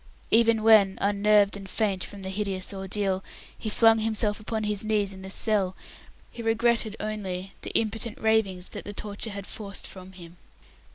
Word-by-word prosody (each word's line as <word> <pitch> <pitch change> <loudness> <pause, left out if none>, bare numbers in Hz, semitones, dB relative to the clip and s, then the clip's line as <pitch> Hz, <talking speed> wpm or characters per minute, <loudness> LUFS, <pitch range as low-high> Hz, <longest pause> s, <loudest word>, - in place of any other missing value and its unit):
Even 225 -1 +4
when, 210 -4 +6
unnerved 205 0 +3
and 195 -1 -8
faint 195 -3 0
from 200 -1 -7
the 190 - -4
hideous 195 -1 -1
ordeal, 195 0 -2 0.3
he 220 - -5
flung 225 +1 +5
himself 215 -1 0
upon 215 +1 -3
his 210 -1 0
knees 210 -2 +1
in 190 - -11
the 190 - -8
cell, 195 -2 +1 0.6
he 235 - -8
regretted 225 -1 +1
only 195 -3 -4
the - - -5
impotent 225 0 -2
ravings 210 -5 +1
that - - -7
the 205 - -7
torture 205 +2 -4
had 200 -1 -6
forced 200 -2 -6
from 185 0 -9
him. 175 -1 -12
205 Hz, 170 wpm, -27 LUFS, 195-220 Hz, 0.6 s, when